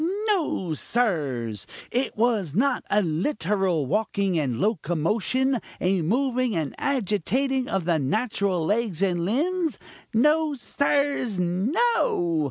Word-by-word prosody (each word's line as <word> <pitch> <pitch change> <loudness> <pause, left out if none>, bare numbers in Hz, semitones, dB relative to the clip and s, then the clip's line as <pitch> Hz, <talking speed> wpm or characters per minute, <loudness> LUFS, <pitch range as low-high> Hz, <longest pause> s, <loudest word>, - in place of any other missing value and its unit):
No, 300 - 0
sirs! 140 - -1 0.2
it 250 -1 -1
was 215 - +1
not 255 +4 +2
a 210 0 +3
literal 180 - 0
walking 200 +1 0
and 125 -6 -1
locomotion, 215 - 0 0.2
a 185 0 +1
moving 250 - 0
and 155 -4 -2
agitating 265 - 0
of 190 -4 -1
the 165 -2 +2
natural 195 - 0
legs 205 -2 0
and 175 -3 +1
limbs. 320 - 0 0.3
No, 300 +5 +3
sirs! 280 -4 0
no! 190 - +1
210 Hz, 110 wpm, -25 LUFS, 170-265 Hz, 0.3 s, a